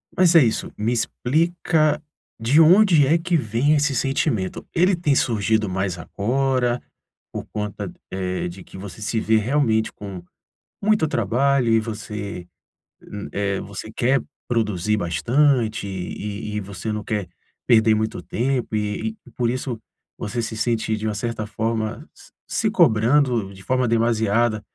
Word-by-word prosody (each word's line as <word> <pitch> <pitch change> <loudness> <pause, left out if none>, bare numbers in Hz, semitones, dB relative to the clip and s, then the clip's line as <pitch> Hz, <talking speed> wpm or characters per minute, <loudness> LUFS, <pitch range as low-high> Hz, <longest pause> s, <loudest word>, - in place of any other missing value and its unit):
Mas 175 -1 +4
é 160 - +9
isso. 110 - -1
Me 110 +3 0
explica 155 +6 +1 0.4
de 125 +8 +3
onde 170 -3 +6
é 160 +4 +4
que 170 0 +1
vem 125 +5 +1
esse 145 -1 +1
sentimento. 125 - -1
Ele 180 +2 +3
tem 155 -5 +1
surgido 110 -3 +1
mais 95 -1 -2
agora 125 +6 0 0.5
por - - -5
conta, 105 -1 -4 0.2
eh, 95 -1 -2
de 95 +2 -10
que - - -12
você 100 +2 -9
se 110 +2 -1
vê 110 0 +3
realmente 110 -2 +1
com 100 -3 -8 0.6
muito 210 -5 +3
trabalho 125 +1 +1
e 115 - +5
você, 105 -4 -6 0.6
hum, 105 -1 -8
eh, 100 -1 -1
você 100 +2 -7
quer 125 +3 +2 0.3
produzir 105 -3 0
bastante 110 - +1
e 100 +3 -5
e - - 0
você 100 +2 -5
não 105 0 -3
quer 105 -5 -2 0.4
perder 110 -2 +5
muito 110 -4 -2
tempo 125 +3 -1
e 105 +1 -2
e 125 - -16
por 120 -2 +1
isso 125 -2 -3 0.4
você 115 +3 -3
se 115 -1 -4
sente 110 -1 0
de 110 +1 -3
uma 105 - -2
certa 110 0 -3
forma, 110 0 -2
se - - -18 0.2
se - - +1
cobrando 115 -1 +3
de 95 0 -13
forma 130 +3 +1
demasiada 115 -1 +2
110 Hz, 150 wpm, -22 LUFS, 105-130 Hz, 0.6 s, é